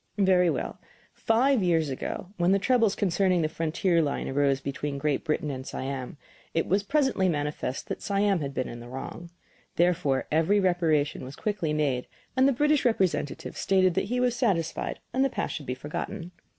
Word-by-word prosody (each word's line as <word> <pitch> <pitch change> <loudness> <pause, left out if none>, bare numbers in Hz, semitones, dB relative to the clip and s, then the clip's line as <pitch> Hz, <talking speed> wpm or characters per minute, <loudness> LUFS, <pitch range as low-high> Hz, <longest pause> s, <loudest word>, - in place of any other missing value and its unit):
Very 185 -3 +4
well; - - -3 0.3
five 245 +2 +2
years 165 -4 +2
ago, 155 +6 -5
when 175 +1 +3
the - - +5
troubles 225 0 +2
concerning 185 -2 +2
the - - +2
frontier 165 +2 +1
line 145 -3 -1
arose 140 0 +2
between 140 +1 -4
Great 145 0 0
Britain 150 -2 -1
and 130 -1 -5
Siam, 135 0 -5 0.4
it 165 - +2
was 195 +3 +2
presently 255 -5 +1
manifest 145 -4 -3
that - - -4
Siam 200 -1 +1
had 140 -2 -3
been 130 -2 -2
in 120 - -7
the 120 +1 -10
wrong. 135 +6 -7 0.5
Therefore 170 -6 +2
every 165 +7 +3
reparation 165 -7 +1
was 130 +2 -8
quickly 200 -7 -2
made, 145 -5 0 0.3
and 260 +1 +5
the - - +4
British 295 +3 +2
representative 180 - 0
stated 185 -2 +3
that - - 0
he 245 +5 -1
was 250 -1 +2
satisfied 180 -10 0 0.2
and 260 +2 +2
the 275 - +2
past - - -3
should 145 - -6
be 125 - -2
forgotten. 170 +6 -5
170 Hz, 180 wpm, -27 LUFS, 145-200 Hz, 0.5 s, the